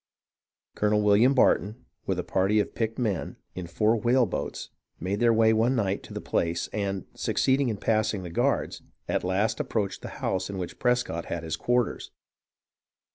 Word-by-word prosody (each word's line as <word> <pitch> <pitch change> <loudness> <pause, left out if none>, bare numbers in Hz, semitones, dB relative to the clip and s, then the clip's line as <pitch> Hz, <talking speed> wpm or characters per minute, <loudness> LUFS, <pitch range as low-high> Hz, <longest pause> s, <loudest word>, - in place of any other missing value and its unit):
Colonel 105 0 +1
William 105 +6 +5
Barton, 115 0 +2 0.2
with - - 0
a - - -1
party 100 +3 +2
of 105 - -1
picked 115 -1 -2
men, 105 -9 -2 0.2
in 90 -2 -6
four 105 +6 +2
whaleboats 120 -1 0 0.3
made 95 +4 -2
their 120 -1 +4
way 110 0 +4
one 115 +4 +2
night 100 -4 0
to - - -11
the - - -2
place, 85 0 -1
and, 100 -3 -2
succeeding 135 -1 +1
in 110 - -2
passing 110 -2 0
the 85 - -7
guards, - - 0 0.3
at - - 0
last 100 +5 0
ap - - -6
proached 105 -4 -1
the - - -8
house 95 0 -2
in 100 - -5
which 90 -2 -6
Prescott 125 -9 0
had 85 -1 -4
his 80 0 -2
quarters. 120 -1 0
105 Hz, 175 wpm, -27 LUFS, 95-115 Hz, 0.3 s, William